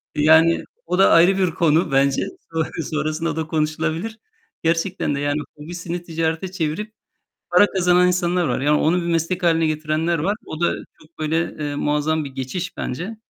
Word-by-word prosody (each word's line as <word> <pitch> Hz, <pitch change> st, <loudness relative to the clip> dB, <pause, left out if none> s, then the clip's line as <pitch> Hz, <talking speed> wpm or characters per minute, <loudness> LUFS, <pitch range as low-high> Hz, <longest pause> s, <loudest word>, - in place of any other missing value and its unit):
Yani, 160 Hz, +2 st, +5 dB, 0.2 s
o 180 Hz, -, -1 dB
da 195 Hz, -, +6 dB
ayrı 180 Hz, +4 st, +6 dB
bir 185 Hz, -3 st, +2 dB
konu 160 Hz, 0 st, +2 dB
bence. 135 Hz, 0 st, +2 dB, 0.3 s
Son 160 Hz, -1 st, +1 dB, 0.2 s
sonrasında 155 Hz, +1 st, -2 dB
da 160 Hz, -1 st, -3 dB
konuşulabilir. 160 Hz, +7 st, -2 dB, 0.4 s
Gerçekten 165 Hz, -1 st, 0 dB
de -, -, -3 dB
yani, 145 Hz, +1 st, 0 dB, 0.2 s
hobisini 175 Hz, +3 st, -6 dB
ticarete 165 Hz, +2 st, -2 dB
çevirip 190 Hz, +4 st, -3 dB, 0.6 s
para 180 Hz, +3 st, +6 dB
kazanan 180 Hz, -2 st, +3 dB
insanlar 180 Hz, 0 st, +1 dB
var. 125 Hz, -, -1 dB
Yani, 150 Hz, +2 st, +3 dB
onu 165 Hz, +3 st, +2 dB
bir -, -, -4 dB
meslek 170 Hz, +2 st, -1 dB
hâline 165 Hz, -1 st, +3 dB
getirenler 155 Hz, +2 st, 0 dB
var. 195 Hz, +8 st, 0 dB
O 155 Hz, -, -7 dB
da 175 Hz, -, +2 dB, 0.3 s
çok 155 Hz, +2 st, -24 dB
böyle, 155 Hz, +1 st, 0 dB, 0.2 s
eee, 145 Hz, -1 st, -3 dB
muazzam 150 Hz, +1 st, 0 dB
bir 140 Hz, -, -7 dB
geçiş 135 Hz, +8 st, -5 dB
bence 180 Hz, -, -4 dB
165 Hz, 165 wpm, -21 LUFS, 155-175 Hz, 0.6 s, da